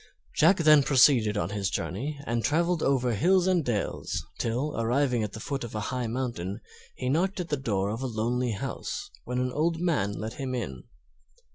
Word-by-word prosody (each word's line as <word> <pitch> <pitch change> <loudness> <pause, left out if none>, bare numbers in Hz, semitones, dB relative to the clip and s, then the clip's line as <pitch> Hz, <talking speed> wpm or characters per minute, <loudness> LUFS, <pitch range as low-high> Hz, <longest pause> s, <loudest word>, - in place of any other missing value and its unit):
Jack 180 +5 +5
then 155 -3 +6
proceeded 125 -6 +4
on 100 - -1
his 100 -2 -1
journey, 125 - -3
and 115 -1 -1
traveled 170 +2 +1
over 125 -3 +2
hills 180 - +3
and 185 -3 +2
dales 115 -6 -2
till, 125 +6 -1
arriving 120 +1 +1
at 105 -1 -3
the 110 - -6
foot 140 +4 -3
of 115 -2 -7
a - - -1
high 125 -2 -1
mountain, 115 -6 -3 0.4
he 125 - -4
knocked 185 +8 +1
at 175 -2 -4
the 150 - +1
door 100 -7 -1
of 115 +4 -4
a 135 - -1
lonely 120 +1 -1
house, 100 - -5
when 125 +1 -3
an 125 0 0
old 160 +4 0
man 145 - +1
let 110 +2 -5
him 130 -2 -4
in. 65 - -5
125 Hz, 190 wpm, -28 LUFS, 110-150 Hz, 0.4 s, then